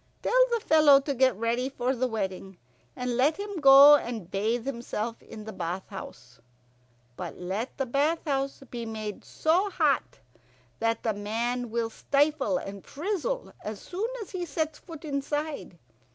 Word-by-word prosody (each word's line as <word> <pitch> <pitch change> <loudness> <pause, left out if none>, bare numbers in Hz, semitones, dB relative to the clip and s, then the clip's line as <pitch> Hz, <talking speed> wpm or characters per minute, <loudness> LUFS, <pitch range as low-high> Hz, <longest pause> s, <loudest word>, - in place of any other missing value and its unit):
"Tell - - +5
the 470 - +2
fellow 305 -3 +7
to 280 +1 -2
get 260 -1 +3
ready 235 +4 -1
for 260 0 -1
the 255 +1 0
wedding, 195 -4 -4 0.4
and 250 -1 -2
let 285 +5 +3
him 405 -2 -5
go 275 0 +10
and 225 -10 -4
bathe 225 +4 0
himself 235 -3 -4
in 215 - -10
the 220 0 -8
bath 175 +2 -4
house. 125 -10 -10 0.8
But - - -6
let 195 +7 -4
the 270 - 0
bath 290 +7 0
house 275 -2 -2
be 240 -1 -4
made 215 -2 -5
so 355 +6 +1
hot 310 -7 +1 0.6
that 225 0 0
the 220 - +1
man 235 +4 -2
will 230 0 -1
stifle 285 +2 +1
and 195 -6 -7
frizzle 410 - -3
as 210 -1 -5
soon 405 +6 -3
as - - -14
he 370 -2 -3
sets 315 -3 -3
foot 325 -2 -11
inside. 295 +1 -3
260 Hz, 160 wpm, -28 LUFS, 220-300 Hz, 0.8 s, go